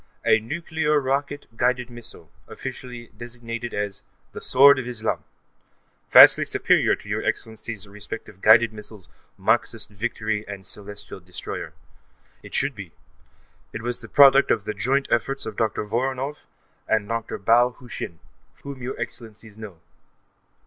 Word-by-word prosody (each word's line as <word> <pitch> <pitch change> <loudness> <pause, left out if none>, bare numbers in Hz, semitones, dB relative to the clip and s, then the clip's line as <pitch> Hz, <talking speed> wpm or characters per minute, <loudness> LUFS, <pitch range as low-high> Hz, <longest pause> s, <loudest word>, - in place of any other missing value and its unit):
A 110 - +5
nuclear 150 +4 -1
rocket 140 +1 -2
guided 125 +1 0
missile, 120 -1 -9 0.2
officially 120 -2 -8
designated 120 0 -6
as 105 -1 -3 0.3
the - - -8
Sword 140 +1 +6
of 125 - -5
Islam, 115 -3 -2 0.9
vastly - - +9
superior - - +2
to - - -16
your - - -2
Excellencies' 110 -2 -4
respective 105 -1 -9
guided 110 +1 +6
missiles 105 -3 -10 0.3
Marxist - - 0
Victory 110 0 -2
and 100 -2 -8
Celestial 105 0 -7
Destroyer. 90 0 -7 0.7
It - - -10
should - - +1
be; - - -10 0.8
it 110 - -6
was 120 0 -3
the - - -10
product 140 0 +7
of 110 - +2
the 105 - -3
joint 135 +7 0
efforts 135 +4 0
of 110 -2 -6
Dr. 110 -1 -1
Voronoff 130 +6 -3 0.4
and 110 -2 +1
Dr. 115 0 -3
Bao 120 +4 +3
Hu 125 - -15
Shin, 85 -7 -6 0.5
whom 140 -2 -8
your 125 +2 -5
Excellencies 110 -3 -8
know. 105 -7 -10
115 Hz, 140 wpm, -24 LUFS, 105-125 Hz, 0.9 s, vastly